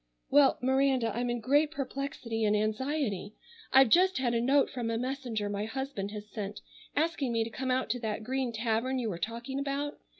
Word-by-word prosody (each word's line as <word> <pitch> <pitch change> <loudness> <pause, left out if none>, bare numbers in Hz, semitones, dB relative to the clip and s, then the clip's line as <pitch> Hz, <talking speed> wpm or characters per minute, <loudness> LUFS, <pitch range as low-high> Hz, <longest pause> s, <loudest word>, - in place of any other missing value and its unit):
"Well, 280 -1 +6
Miranda, 260 -4 +2
I'm 245 +1 -1
in 240 0 -1
great 290 +6 +3
perplexity 275 -6 -4
and 210 0 +3
anxiety. 215 -2 -1 0.4
I've 265 -2 +7
just 370 +7 +5
had 245 -2 +1
a 230 - +1
note 275 +3 +3
from 240 -3 -3
a 225 - 0
messenger 250 -4 -2
my 205 +1 -2
husband 260 -4 -4
has 210 0 -7
sent 210 -1 -6 0.3
asking 305 -4 0
me 230 -1 +1
to 225 - -6
come 260 +2 -3
out 255 -3 +1
to 245 - -1
that 220 -1 -3
Green 260 +1 -1
Tavern 230 +3 0
you 240 -3 -1
were 170 - -5
talking 235 +7 -4
about. 280 +1 -3
245 Hz, 195 wpm, -30 LUFS, 220-275 Hz, 0.4 s, I've